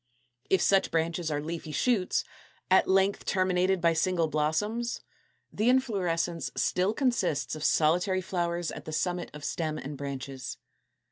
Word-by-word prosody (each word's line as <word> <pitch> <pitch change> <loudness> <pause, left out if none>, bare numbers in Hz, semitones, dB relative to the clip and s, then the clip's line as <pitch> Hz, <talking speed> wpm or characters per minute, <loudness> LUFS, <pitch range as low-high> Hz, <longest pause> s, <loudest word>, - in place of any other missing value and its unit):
If 190 - +3
such 195 -1 +3
branches 165 0 -1
are 145 -1 -1
leafy 165 0 -5
shoots, 205 +1 +1 0.5
at 190 - +5
length 195 +1 +2
terminated 185 0 +1
by 170 -1 +3
single 165 0 +1
blossoms, 210 +11 -1 0.5
the 220 +3 +2
inflorescence 180 -10 0
still 185 +3 +1
consists 195 - 0
of 155 - -7
solitary 180 +6 +2
flowers 175 -2 -2
at - - -8
the 155 - -6
summit 175 +2 -1
of 150 -1 -7
stem 155 -2 -2
and 145 0 -6
branches. 135 -2 -6
175 Hz, 140 wpm, -29 LUFS, 155-190 Hz, 0.5 s, at